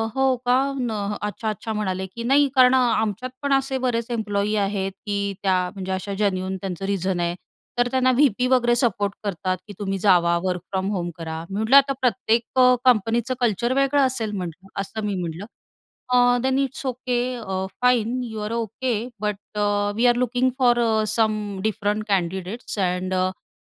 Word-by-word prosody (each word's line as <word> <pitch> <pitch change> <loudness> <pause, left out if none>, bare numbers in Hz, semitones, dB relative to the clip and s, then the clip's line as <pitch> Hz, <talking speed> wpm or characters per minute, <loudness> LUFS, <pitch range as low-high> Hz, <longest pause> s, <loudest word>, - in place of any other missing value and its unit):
हो 265 -1 +3
का? 245 0 +4 0.2
न 245 -3 -1 0.3
अच्छा, 210 +2 -3
अच्छा." 215 +1 -4
म्हणाले, 190 -3 -2
"की 210 +5 -8
नाही, 280 +4 +4
कारण 255 -1 +6
आमच्यात 235 -2 +1
पण 280 -1 +1
असे 270 0 +1
बरेच 235 -2 0
एम्प्लॉयी 210 -2 -1
आहेत, 195 -1 -1
की 200 -1 -1
त्या, 190 -1 +3 0.2
म्हणजे 190 -1 -5
अशा 190 +2 -3
जन्यून 190 -2 0
त्यांचं 190 0 -5
रिझन 190 -2 -1
आहे, 170 0 -1 0.4
तर 245 0 +3
त्यांना 255 -1 +3
व्ही-पी 255 -2 +3
वगैरे 245 -2 +3
सपोर्ट 205 -5 0
करतात, 185 -2 -2
की 205 - -9
तुम्ही 195 -1 -2
जावा, 175 -3 +4
वर्क 180 -1 -1
फ्रॉम 190 0 -1
होम 175 -4 -2
करा." 160 -1 -5
मी 195 - -4
म्हटलं, 220 +5 +3
"आता 275 0 +5
प्रत्येक 235 +1 +1 0.3
कंपनीचं 235 0 +3
कल्चर 235 +1 +1
वेगळं 275 +1 +3
असेल," 235 -5 -1
म्हटलं, 180 +1 -6
असं 210 +2 -5
मी 205 -1 -1
म्हटलं, 170 +3 -5 0.6
"अ, 245 0 +4
then 265 0 +1
it's 275 0 -2
okay. 250 -1 -1 0.2
A, 190 -5 -3 0.2
fine, 250 0 +2
you 220 -2 -6
R 215 - -4
okay. 235 +2 -2 0.3
But, 210 -1 -1 0.2
a, 205 0 +1
we 235 +2 +3
R 240 0 +4
looking 250 +1 +1
for 240 -2 +4 0.4
some 215 -3 0
different 215 0 -1
candidates 190 +4 -2
and 185 0 0
a, 185 0 -2
215 Hz, 170 wpm, -23 LUFS, 190-245 Hz, 0.6 s, कारण